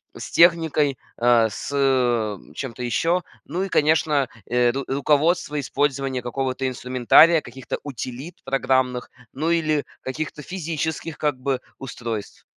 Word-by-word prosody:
с - - -8
техникой, 160 -5 +4 0.2
э, 120 -1 +4
с, - - -6
э, 120 -6 +2 0.2
чем-то 125 -2 -6
еще, 165 - +1 0.2
ну 180 +2 -2
и, 195 - -3
конечно, 150 -4 +2 0.2
э, 120 0 +3
ру 135 +1 -4
руководство 150 +3 +1
использования 135 -2 -1
какого-то 130 +1 -2
инструментария, 130 +6 +5
каких-то 130 0 -6
утилит 135 +4 -7
программных, 130 -2 0 0.2
ну 155 +5 -1
или 155 -3 +1 0.2
каких-то 150 +3 -5
физических, 160 -2 -4
как 145 -3 0
бы, 130 -1 -1 0.2
устройств. 115 -5 -6
135 Hz, 125 wpm, -23 LUFS, 125-155 Hz, 0.2 s, инструментария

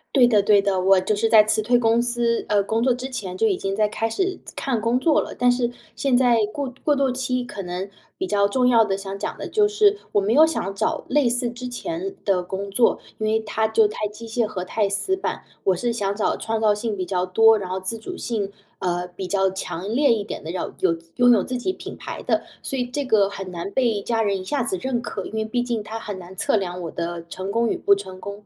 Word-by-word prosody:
对 250 -3 +7
的 210 -3 +4
对 200 0 +5
的。 195 -2 0
我 195 +1 +5
就 200 - 0
是 225 +2 +1
在 220 -2 +8
辞 215 0 +2
退 245 +3 +3
公 230 0 +3
司 240 -1 0
呃， 205 -1 +2
工 220 +3 -1
作 255 0 +3
之 255 +2 -5
前， 190 -7 -5
就 225 - +3
已 195 -4 +1
经 195 0 -2
在 215 +1 +3
开 225 +1 -2
始 370 +10 -1 0.2
看 245 -5 -1
工 230 +3 +1
作 315 +1 +3
了。 - - -7
但 245 0 +4
是 245 -1 0 0.3
现 270 -3 +2
在 245 -2 +4 0.2
过 275 -3 -4
过 295 -1 +4
渡 270 -2 +1
期 255 0 -1
可 210 -4 -7
能 180 +2 -4 0.3
比 375 - -2
较 200 - +2
重 250 +4 +1
要 230 -3 +5
的 195 -2 0
想 195 0 -6
讲 - - -4
的 - - -6
就 420 -1 +3
是 415 -1 +3 0.2
我 205 - +4
没 210 +4 +1
有 310 +4 +7
想 195 - -2
找 215 +3 -1
类 280 -2 +3
似 245 0 0
之 250 +1 -7
前 335 +9 -4
的 195 -3 +2
工 195 +2 -5
作， 235 +3 +3 0.2
因 215 - -1
为 220 +1 +2
它 220 0 0
就 220 -1 +4
太 210 0 -3
机 215 +3 -10
械 225 0 0
和 210 -4 -4
太 205 +2 0
死 290 - 0
板。 - - -3 0.2
我 190 - +4
是 240 +7 -1
想 200 -3 -1
找 215 - 0
创 225 0 -2
造 210 -1 +4
性 210 +1 -3
比 185 -2 -3
较 180 -1 -1
多， 225 +4 +5
然 185 - -6
后 185 - -2
自 225 +5 -1
主 365 +12 -7
性， 210 -4 -3 0.3
呃， 180 0 -1
比 185 +1 -6
较 195 0 +2
强 190 +2 -4
烈 280 -1 +4
一 215 -3 -1
点 - - -6
的， 160 - -5
要 180 - -4
有 165 -3 +2 0.2
拥 245 0 +5
有 210 - +3
自 255 - -3
己 370 +10 -2
品 - - -9
牌 - - -7
的。 - - +1 0.2
所 270 - -3
以 245 - 0
这 280 +4 -3
个 205 -5 +3
很 195 -2 -7
难 175 +2 -5
被 235 -6 +1
家 225 +2 0
人 200 -2 0
一 - - -7
下 275 +5 0
子 195 -5 -1
认 255 -2 -1
可， 195 -5 -5
因 - - -9
为 220 0 0
毕 240 +3 -1
竟 235 -3 -2
它 225 +1 -6
很 205 -3 -6
难 180 +1 -11
测 - - +2
量 180 -3 -2
我 165 - -4
的 170 0 -4
成 190 +3 -5
功 230 +2 +1
与 - - 0
不 200 - +4
成 190 -2 -4
功。 200 +1 -8
220 Hz, 280 characters per minute, -23 LUFS, 195-245 Hz, 0.3 s, 在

